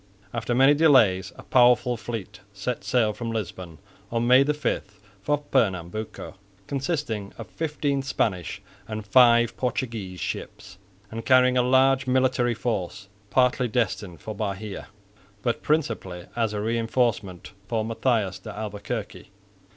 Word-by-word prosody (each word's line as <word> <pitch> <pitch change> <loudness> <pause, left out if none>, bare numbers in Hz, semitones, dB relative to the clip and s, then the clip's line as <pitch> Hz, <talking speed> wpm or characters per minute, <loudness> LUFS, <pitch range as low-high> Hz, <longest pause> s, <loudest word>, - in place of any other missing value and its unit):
After 120 +1 -1
many 135 +3 +6
delays 120 - +4
a - - -12
powerful 125 -1 +4
fleet 110 -3 -6
set 110 +5 -4
sail 115 -4 +2
from 115 +1 -5
Lisbon 95 -7 -5 0.3
on 115 0 0
May 125 +2 +6
5 140 -8 -2 0.2
for 145 +9 +1
Pernambuco, 105 -4 -1 0.3
consisting 135 - -3
of 115 - -7
fifteen 150 -3 -1
Spanish 100 - -2 0.2
and 110 -1 -5
five 120 0 +5
Portuguese 115 -7 -3
ships 95 +2 -6 0.3
and 115 +1 -5
carrying 130 0 +5
a 125 - +4
large 130 +1 +3
military 125 -2 +2
force, 100 -4 -3 0.2
partly 125 +2 +2
destined 105 -6 -2
for 110 - -6
Bahia, 105 -1 -5 0.6
but 120 - -1
principally 110 - -1
as 115 -2 0
a 105 -1 -3
reinforcement 115 -4 -1 0.2
for 110 -1 -1
Matthias 115 -4 0
de 110 - -8
Albuquerque. 105 +1 -5
115 Hz, 130 wpm, -25 LUFS, 105-125 Hz, 0.6 s, many